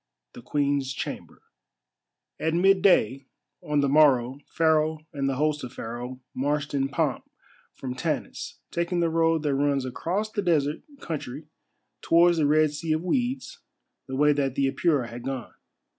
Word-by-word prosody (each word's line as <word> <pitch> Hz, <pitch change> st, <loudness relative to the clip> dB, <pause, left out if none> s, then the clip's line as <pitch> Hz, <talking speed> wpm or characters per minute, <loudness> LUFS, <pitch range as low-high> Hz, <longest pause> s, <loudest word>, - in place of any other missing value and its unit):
THE -, -, -10 dB
QUEEN'S 140 Hz, +1 st, 0 dB
CHAMBER -, -, -7 dB, 1.0 s
At 160 Hz, +1 st, 0 dB
midday 175 Hz, -, +3 dB, 0.3 s
on 150 Hz, -1 st, 0 dB
the 140 Hz, -, +2 dB
morrow 135 Hz, -3 st, +4 dB
Pharaoh 155 Hz, -1 st, +1 dB
and 140 Hz, -2 st, -1 dB
the 135 Hz, -, -1 dB
host 150 Hz, +1 st, 0 dB
of 125 Hz, 0 st, -7 dB
Pharaoh 120 Hz, +3 st, -6 dB
marched 145 Hz, +2 st, -1 dB
in 135 Hz, -1 st, 0 dB
pomp 140 Hz, -2 st, -1 dB, 0.5 s
from 130 Hz, -2 st, -5 dB
Tanis, -, -, -4 dB
taking 170 Hz, +1 st, -1 dB
the 170 Hz, -1 st, +1 dB
road 165 Hz, -1 st, +2 dB
that 145 Hz, -2 st, +1 dB
runs 140 Hz, -1 st, +1 dB
across 185 Hz, -, -2 dB
the 210 Hz, -, -1 dB
desert 155 Hz, -5 st, +1 dB, 0.2 s
country 145 Hz, -2 st, -5 dB, 0.6 s
towards 170 Hz, +1 st, +4 dB
the 150 Hz, -, +3 dB
Red 155 Hz, 0 st, +4 dB
Sea 155 Hz, +1 st, -1 dB
of 155 Hz, +2 st, -1 dB
Weeds, 255 Hz, -, -2 dB, 0.5 s
the 130 Hz, -, -4 dB
way 150 Hz, +2 st, +4 dB
that 135 Hz, -2 st, -1 dB
the 140 Hz, -, +2 dB
Apura 140 Hz, -3 st, +1 dB
had 120 Hz, +1 st, -8 dB
gone. 130 Hz, 0 st, -5 dB
145 Hz, 155 wpm, -26 LUFS, 135-165 Hz, 1.0 s, morrow